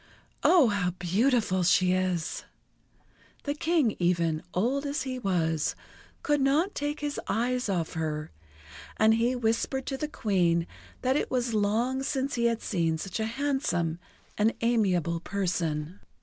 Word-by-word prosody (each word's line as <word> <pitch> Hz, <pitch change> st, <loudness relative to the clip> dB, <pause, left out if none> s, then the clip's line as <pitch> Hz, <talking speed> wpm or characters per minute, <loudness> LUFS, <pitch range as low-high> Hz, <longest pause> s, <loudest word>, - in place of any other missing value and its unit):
"Oh, 325 Hz, -10 st, +6 dB
how 200 Hz, -3 st, 0 dB
beautiful 200 Hz, +1 st, +1 dB
she 180 Hz, +1 st, +4 dB
is!" 185 Hz, -3 st, -1 dB, 1.0 s
The 285 Hz, -, -1 dB
King 305 Hz, -6 st, +1 dB
even, 170 Hz, -3 st, +1 dB
old 245 Hz, +11 st, 0 dB
as 285 Hz, -1 st, -2 dB
he 260 Hz, -1 st, -4 dB
was, 165 Hz, -7 st, 0 dB, 0.5 s
could 295 Hz, -2 st, +2 dB
not 300 Hz, +9 st, +2 dB
take 290 Hz, +1 st, -3 dB
his 290 Hz, -1 st, -2 dB
eyes 245 Hz, 0 st, 0 dB
off 175 Hz, -4 st, -1 dB
her, 155 Hz, -, -3 dB, 0.7 s
and 220 Hz, 0 st, +5 dB
he 235 Hz, +3 st, +2 dB
whispered 245 Hz, +3 st, 0 dB
to 270 Hz, -, -3 dB
the 300 Hz, -, -2 dB
Queen 175 Hz, -, +1 dB, 0.4 s
that 260 Hz, +1 st, +2 dB
it -, -, 0 dB
was 245 Hz, -2 st, -1 dB
long 225 Hz, +5 st, +1 dB
since 270 Hz, 0 st, -1 dB
he 235 Hz, -1 st, 0 dB
had 230 Hz, -1 st, +1 dB
seen 165 Hz, -5 st, 0 dB
such 190 Hz, +6 st, -5 dB
a 220 Hz, -, 0 dB
handsome 230 Hz, -, -1 dB, 0.4 s
and 220 Hz, +2 st, +3 dB
amiable 185 Hz, -8 st, +1 dB
person. 170 Hz, -3 st, -2 dB
220 Hz, 145 wpm, -28 LUFS, 175-265 Hz, 1.0 s, Oh